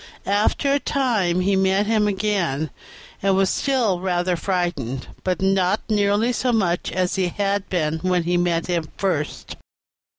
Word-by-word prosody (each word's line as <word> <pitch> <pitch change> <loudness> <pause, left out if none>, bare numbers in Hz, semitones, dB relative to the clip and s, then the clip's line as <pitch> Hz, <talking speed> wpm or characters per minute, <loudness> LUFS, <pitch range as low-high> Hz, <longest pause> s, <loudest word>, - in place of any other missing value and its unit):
After 210 +7 +1
a 285 - +2
time 220 -12 0
he 195 +2 +2
met 190 +1 +2
him 215 -1 +2
again, 190 -8 -1 0.5
and 195 0 +2
was 190 0 +2
still 240 -10 +1
rather 180 -1 0
frightened, 170 - -2 0.2
but 185 -1 -1
not 195 +1 +2
nearly 210 +3 +2
so 250 +1 0
much 185 -7 0
as 185 0 -1
he 185 -1 +1
had 200 +2 -1
been 160 -3 0
when 180 0 +1
he 175 +1 0
met 175 -1 +1
him 170 -3 -2
first. 175 -7 -2
190 Hz, 155 wpm, -22 LUFS, 175-205 Hz, 0.5 s, a